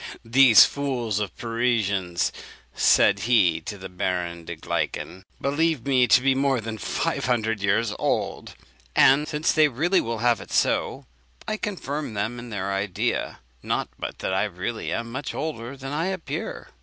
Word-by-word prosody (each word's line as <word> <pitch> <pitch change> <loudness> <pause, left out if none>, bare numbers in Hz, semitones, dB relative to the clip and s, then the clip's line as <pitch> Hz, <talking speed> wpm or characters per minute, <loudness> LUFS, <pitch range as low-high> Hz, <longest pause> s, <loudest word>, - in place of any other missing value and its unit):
"These 120 -2 +8
fools 125 -7 -2
of 100 -5 -4
Parisians," 110 -7 0 0.4
said 100 -1 +4
he 100 -9 +4
to 105 - -7
the 95 0 -8
Baron 90 -2 -3
de - - -6
Gleichen, 95 +2 -4
"believe 145 -1 0
me 130 -3 +3
to 125 +3 +5
be 135 0 +3
more 135 -1 +1
than 110 0 -6
five - - -2
hundred 115 -4 0
years 105 +2 +1
old; - - -2 0.4
and, 140 +3 +5
since 150 0 0
they 155 -1 +5
will 145 -3 0
have 120 +1 +2
it - - -11
so, - - 0 0.4
I 215 - -1
confirm 150 - -4
them 110 +4 -2
in 120 0 -9
their 100 -2 -3
idea. 95 -1 -2 0.2
Not - - -2
but - - -5
that - - 0
I 95 +2 +2
really 105 +4 -4
am 115 0 -3
much 135 +4 -5
older 140 -4 -5
than 135 +1 -6
I 165 +4 -1
appear." 190 -3 -5
115 Hz, 160 wpm, -24 LUFS, 100-140 Hz, 0.4 s, These